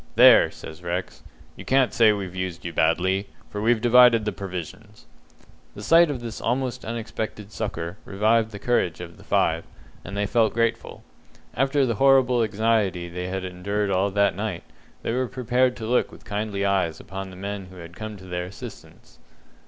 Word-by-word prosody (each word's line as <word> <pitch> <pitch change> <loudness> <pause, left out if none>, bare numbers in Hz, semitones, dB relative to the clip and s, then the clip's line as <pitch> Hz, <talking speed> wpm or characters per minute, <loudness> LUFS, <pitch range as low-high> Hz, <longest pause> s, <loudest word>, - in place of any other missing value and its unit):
"There!" - - +8
says 80 +2 -11
Rex, 90 +1 -4 0.3
"you - - -10
can't 130 -1 +2
say 110 -2 +5
we've 100 -4 -4
used 90 -2 -4
you 85 - -4
badly, 95 +5 +1 0.2
for 105 - -4
we've 115 +1 +3
divided 120 -2 +6
the 105 - 0
provisions." 95 -4 -8 0.7
The 105 - -8
sight 165 +7 +6
of 135 -4 -4
this 115 -1 -6
almost 125 +1 -1
unexpected 110 -2 -5
succour 95 -4 -4
revived 110 +3 +1
the 105 - -8
courage 100 -7 0
of 85 -1 -9
the - - -15
five, 80 +1 +1 0.4
and 100 - -7
they 105 - +1
felt 110 +1 +2
grateful. 115 -1 -1 0.5
After 135 +1 +2
the 120 - 0
horrible 130 -3 +5
anxiety 105 -5 0
they 90 +1 -5
had 95 0 -3
endured 100 +3 -2
all 95 +2 +2
that 100 0 +2
night, - - -4 0.4
they - - -1
were 130 +1 0
prepared 125 0 +1
to 110 - -6
look 125 +3 +1
with - - -15
kindly 105 -1 -2
eyes 95 -5 0
upon 95 0 -7
the 95 - -11
men 100 0 -5
who 95 - -14
had 85 -1 -11
come 110 +2 -7
to 95 - -13
their 90 -1 -4
assistance. 95 +2 -12
105 Hz, 180 wpm, -24 LUFS, 95-115 Hz, 0.7 s, There